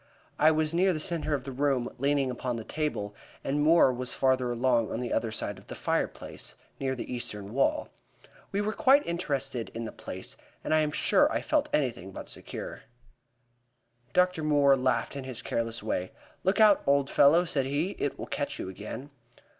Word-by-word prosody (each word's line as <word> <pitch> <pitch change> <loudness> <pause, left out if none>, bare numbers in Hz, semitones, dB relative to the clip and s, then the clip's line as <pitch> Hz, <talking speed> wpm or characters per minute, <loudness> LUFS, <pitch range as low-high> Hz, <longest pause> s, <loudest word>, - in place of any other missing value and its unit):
I 155 - +7
was 155 0 +1
near 185 +2 +3
the 155 - -3
centre 155 -2 -1
of 135 - -4
the 135 - -6
room, 135 -2 +1
leaning 140 -1 +1
upon 125 0 -3
the 115 - -5
table, 145 -8 -3 0.3
and 145 +2 0
Moore 155 -3 +5
was 125 0 -3
farther 130 -2 +2
along 120 -2 +1
on - - -2
the 125 -1 -3
other 115 - 0
side 105 -2 -3
of 100 - -20
the - - -7
fireplace, - - -3 0.2
near 130 -1 -1
the 125 - -5
eastern 105 -4 -5
wall. 135 - +1 0.6
We 200 - 0
were 215 +1 -1
quite 285 0 +5
interested 140 -8 -2
in 115 0 -3
the - - -5
place, - - -8 0.3
and - - 0
I 155 - +5
am 155 -1 +2
sure - - +3
I - - 0
felt 300 -1 +1
anything 120 -10 -1
but - - -8
secure. - - -6 1.3
Dr. 180 -1 +2
Moore 145 -2 +5
laughed 130 +1 0
in 140 - -4
his 130 -2 -6
careless 115 -1 -2
way. 95 -4 -2 0.3
"Look 190 +4 +2
out, 210 -2 +6
old 140 -1 +3
fellow," 165 +5 +6
said 135 -5 -1
he, 150 +7 0
"it 145 - -1
will - - -5
catch - - -3
you - - -5
again." 110 +9 -7
135 Hz, 190 wpm, -29 LUFS, 120-155 Hz, 1.3 s, I